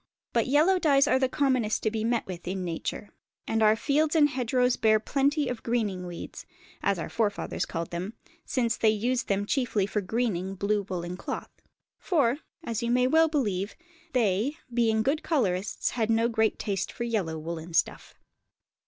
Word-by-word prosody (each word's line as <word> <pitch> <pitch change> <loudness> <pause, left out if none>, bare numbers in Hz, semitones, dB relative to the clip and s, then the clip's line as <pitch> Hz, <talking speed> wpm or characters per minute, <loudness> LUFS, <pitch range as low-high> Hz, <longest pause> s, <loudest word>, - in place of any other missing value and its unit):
But 230 0 +2
yellow 315 +8 +4
dyes 280 -5 +4
are 260 - +3
the 260 -1 +2
commonest 255 -6 +1
to 220 - +1
be 220 -1 -2
met 235 0 0
with 175 -2 -8
in 185 0 -2
nature, 170 +4 -4 0.4
and 225 0 0
our 215 0 +6
fields 295 +6 +1
and 295 -2 +5
hedgerows 250 -1 +1
bear 215 -1 +3
plenty 280 +5 +1
of 245 -2 -4
greening 210 -6 -1
weeds, 175 -1 -8 0.4
as 200 -1 +1
our 165 - -4
forefathers 210 -3 -1
called 165 -1 -4
them, 185 +6 -4 0.3
since 235 -4 0
they 220 - +4
used 240 +4 0
them 200 0 0
chiefly 230 -5 0
for 205 +1 -1
greening 195 -3 -1
blue 200 +1 0
woollen 175 0 -4
cloth; - - -5 0.5
for, 285 -7 +1 0.2
as 230 -5 -3
you 235 - -1
may 250 +1 +3
well 320 +5 +5
believe, 210 - -1 0.4
they, 230 +4 +1 0.2
being 225 -2 +2
good 285 +5 +1
colourists, 205 - 0
had 225 -2 -1
no 225 +1 +3
great 220 -2 +1
taste 195 -3 -2
for 235 - -5
yellow 200 -9 -1
woollen 165 +1 -6
stuff. 165 - 0
225 Hz, 175 wpm, -27 LUFS, 195-255 Hz, 0.5 s, our